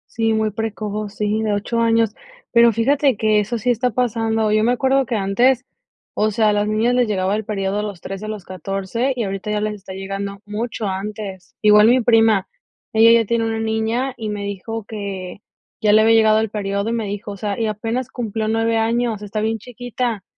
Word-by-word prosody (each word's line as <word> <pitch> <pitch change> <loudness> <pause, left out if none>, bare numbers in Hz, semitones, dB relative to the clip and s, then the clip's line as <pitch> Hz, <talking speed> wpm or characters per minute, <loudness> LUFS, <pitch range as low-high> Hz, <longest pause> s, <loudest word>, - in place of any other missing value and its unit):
Sí, 225 -1 +1
muy 220 0 +1
precoz, 210 -1 -4
sí, 210 +1 0
de 215 - 0
8 210 +3 -1
años, 230 -2 +2 0.4
pero, 235 -1 +6
fíjate 270 +2 +2
que 215 -1 +3
eso 230 +3 -2
sí 245 +3 0
está 245 +2 +1
pasando. 225 -2 0
Yo 215 0 +3
me 240 - +3
acuerdo 265 +1 +2
que 240 - -3
antes, 240 +7 +2 0.5
o 215 +1 +1
sea, 215 +1 +2
a - - +3
las 205 0 +1
niñas 220 +3 +1
les 250 -1 +3
llegaba 195 0 0
el 215 - -3
período 200 -1 -2
a - - -2
los 200 -4 -6
13, 195 +2 -6
a - - -5
los 215 -4 -6
14, 195 - -2
y 240 -3 -2
ahorita 195 +1 -4
ya 210 0 0
les 210 0 -2
está 190 -2 -10
llegando 195 +1 -5
mucho 220 +1 -4
antes. 195 -1 -6
Igual 210 0 +6
mi 250 +2 +5
prima, 225 -4 +3 0.5
ella 225 +1 +7
ya 225 - -1
tiene 230 +1 +1
una 225 0 -1
niña 225 +4 -1
y 220 -2 -4
me 205 -1 -4
dijo: 200 +2 -5
"Que 200 -3 -6 0.4
ya 210 -1 +4
le 215 - +6
había 225 +1 +5
llegado 220 -1 +5
el 220 - -1
período", 200 0 -2
y 230 - -1
me 225 -2 -1
dijo: 205 0 -5
"O - - -8
sea, 205 +2 -3
y 225 - +1
apenas 225 +4 -2
cumplió 220 -3 -3
9 225 0 +1
años, 230 -1 0
está 210 +1 -4
bien 225 0 0
chiquita". 245 -2 -4
215 Hz, 215 wpm, -20 LUFS, 205-230 Hz, 0.5 s, ella